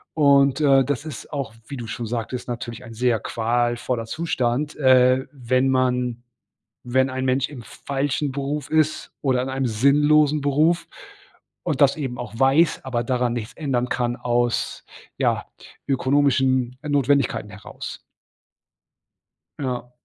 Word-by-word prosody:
Und, 140 -1 +4
äh, 135 -2 +5
das 145 +3 -3
ist 155 -5 -8
auch, 135 -7 -4
wie 140 - -6
du 120 - -6
schon 115 +1 -5
sagtest, 120 +2 -4
natürlich 120 0 -6
ein 115 -2 -10
sehr 120 -1 +1
qualvoller 120 +1 -1
Zustand, 145 -1 -1
äh, 130 -1 +4
wenn 130 -1 +1
man 125 -2 0 0.6
wenn 130 +2 +2
ein 130 0 -3
Mensch 130 +1 +1
im 140 -5 -9
falschen 140 +4 -3
Beruf 140 +2 -3
ist 155 -1 +1
oder 130 -3 +1
in - - -4
einem 130 0 -1
sinnlosen 145 +5 +3
Beruf 150 +5 +2 0.8
und - - -2
das 140 -1 +5
eben 130 -5 -4
auch 120 -3 -7
weiß, 135 +5 +3
aber 120 -2 -1
daran 125 -1 0
nichts 115 -2 -5
ändern 125 -5 -1
kann 120 -1 -1
aus, 120 -1 -1 0.3
ja, - - 0 0.4
ökonomischen 130 -2 +2
Notwendigkeiten 140 -6 +1
heraus. 105 0 -8 1.6
Ja. 125 -3 -4
130 Hz, 135 wpm, -23 LUFS, 120-140 Hz, 1.6 s, äh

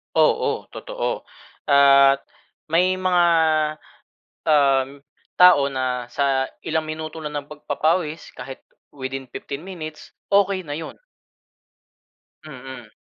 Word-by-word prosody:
Oo, - - +2
totoo. - - -4 0.4
At 140 -1 +6 0.5
may 180 +3 +2
mga, 180 -1 +3 1.2
uhm, 140 -3 +4 0.5
tao 180 -6 +7
na 125 -2 -2
sa 135 -1 +1 0.2
ilang 160 0 0
minuto 155 +1 -6
lang 150 0 -6
ng 145 - -8
pagpapawis 155 +2 -1
kahit 130 +1 -8 0.4
within 135 -1 -5
15 140 +2 -7
minutes, 155 -5 -8 0.2
okey 195 -1 +3
na 145 - -4
'yon. 165 - -8 1.4
Mm. 130 -5 -10
150 Hz, 100 wpm, -22 LUFS, 135-165 Hz, 1.4 s, tao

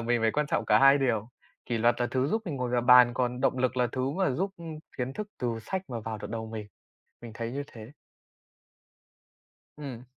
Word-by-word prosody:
mình 120 0 +1
phải 115 - +3
quan 150 +4 0
trọng - - 0
cả - - +5
hai 135 +1 +7
điều, 115 -4 0 0.4
kỷ 120 -2 -1
luật 120 +1 +4
là 120 - +2
thứ 130 0 +1
giúp 220 +4 0
mình 155 -8 -4
ngồi 125 -1 -2
vào 125 - +2
bàn, 125 -1 +7
còn 125 0 -1
động 130 0 +1
lực 130 0 0
là 125 -1 +3
thứ 130 +1 -1
mà 185 +1 0
giúp, 185 +10 -1
ưm, 165 -2 -8 0.2
kiến 125 +1 -2
thức 210 +7 -5
từ 120 -2 -2
sách 190 +11 -3
mà 120 -2 -4
vào 110 0 -5
được - - -7
đầu 110 0 -4
mình. 110 -2 -6 0.6
Mình 115 -2 -9
thấy 115 0 -4
như 140 +2 -3
thế. 115 +2 -11 1.9
Ừm. 135 -5 -7
125 Hz, 225 wpm, -28 LUFS, 115-135 Hz, 1.9 s, hai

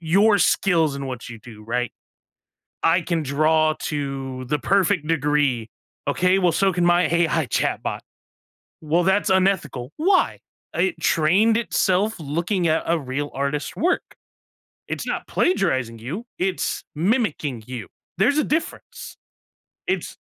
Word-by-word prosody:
your 200 +6 +4
skills 165 -9 +2
and 140 0 -5
what 125 -2 -6
you 115 - -9
do, 110 -1 -13
right? 120 +2 -1 0.9
"I 170 +2 +4
can 165 -1 -1
draw 155 +2 +2
to 135 -3 -4
the 150 +4 -1
perfect 190 -2 +1
degree." 145 -7 +1 0.4
"Okay, 185 +1 +2
well, 180 -2 +3
so 195 +3 +2
can 175 0 0
my 175 0 +4
AI 165 -2 +1
chatbot." - - -1 0.8
"Well, 160 +3 +1
that's 190 +3 +2
unethical." 190 -9 +1
"Why? 370 +4 +2 0.4
It 360 - 0
trained 190 +8 +3
itself 210 -2 +1
looking 170 +5 -1
at 160 0 +1
a 170 - +2
real 140 +2 -3
artist's 140 +2 -2
work, 360 +2 0 0.7
it's - - -4
not - - -3
plagiarizing 130 - 0
you, 165 - -6
it's 185 0 -1
mimicking 160 - 0
you, 125 -5 -6 0.3
there's 245 - +3
a - - +2
difference, 315 +2 -4 0.7
it's" - - -2
160 Hz, 135 wpm, -23 LUFS, 140-190 Hz, 0.9 s, your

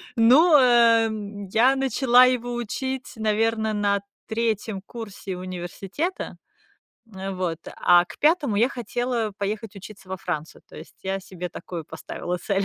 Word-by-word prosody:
Ну, 270 +9 +6
эм, 225 -5 +3
я 235 +7 +4
начала 260 -2 +5
его 245 -1 0
учить, 260 +3 -4
наверно, 220 0 0
на 205 -1 +1 0.3
3 220 -3 -1
курсе 205 -5 -7
университета, 185 - -5 0.8
эм, 190 0 -5
вот, 175 -3 -2 0.2
а 175 0 +5
к - - -12
5 300 - +2
я 230 +4 +4
хотела 240 -3 -2
поехать 210 +1 -4
учиться 195 -1 -12
во 190 - -3
Францию, 155 -3 -5
то - - -17
есть - - -12
я 195 0 -2
себе 180 -2 -7
такую 170 -1 -7
поставила 180 +3 -5
цель. 195 +1 -1
220 Hz, 140 wpm, -24 LUFS, 195-245 Hz, 0.8 s, Ну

